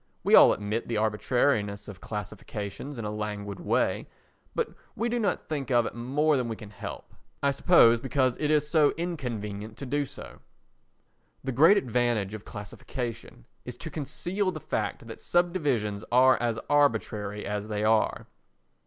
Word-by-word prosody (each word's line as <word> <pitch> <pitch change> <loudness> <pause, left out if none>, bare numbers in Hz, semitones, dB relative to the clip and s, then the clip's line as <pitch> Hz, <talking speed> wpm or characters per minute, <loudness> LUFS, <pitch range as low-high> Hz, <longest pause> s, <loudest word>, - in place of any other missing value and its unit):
We - - +1
all - - +9
admit 105 +3 -2
the 115 - -1
arbitrariness 105 0 +1
of 100 -2 -10
classifications 105 +5 -6
in 115 - -4
a 105 - -2
languid 105 -2 -4
way, - - 0 0.5
but - - 0 0.3
we 235 +3 -1
do 240 +1 0
not 200 -5 0
think 145 -4 -3
of 120 -2 +3
it - - -4
more 140 +6 +1
than 125 -2 -1
we 115 - -3
can 105 -2 -11
help—I 140 +7 -5
suppose 135 -6 +5
because 130 -1 +1
it 150 - 0
is 150 -1 +3
so 150 -2 +3
inconvenient 110 - -4
to 140 - -6
do 145 +2 0
so. - - -11 1.0
The 135 - -2
great 160 - +6
advantage 120 - 0
of 110 -1 -8
classification 115 - -7 0.2
is 125 - -8
to 160 +4 -7
conceal 175 +7 -2
the 185 - -4
fact - - -3
that - - -9
subdivisions 145 - 0
are 130 +2 +6
as 120 -2 0
arbitrary 110 -7 +1
as 105 +1 -3
they 105 -1 -2
are. 110 0 +2
120 Hz, 160 wpm, -28 LUFS, 105-145 Hz, 1.0 s, all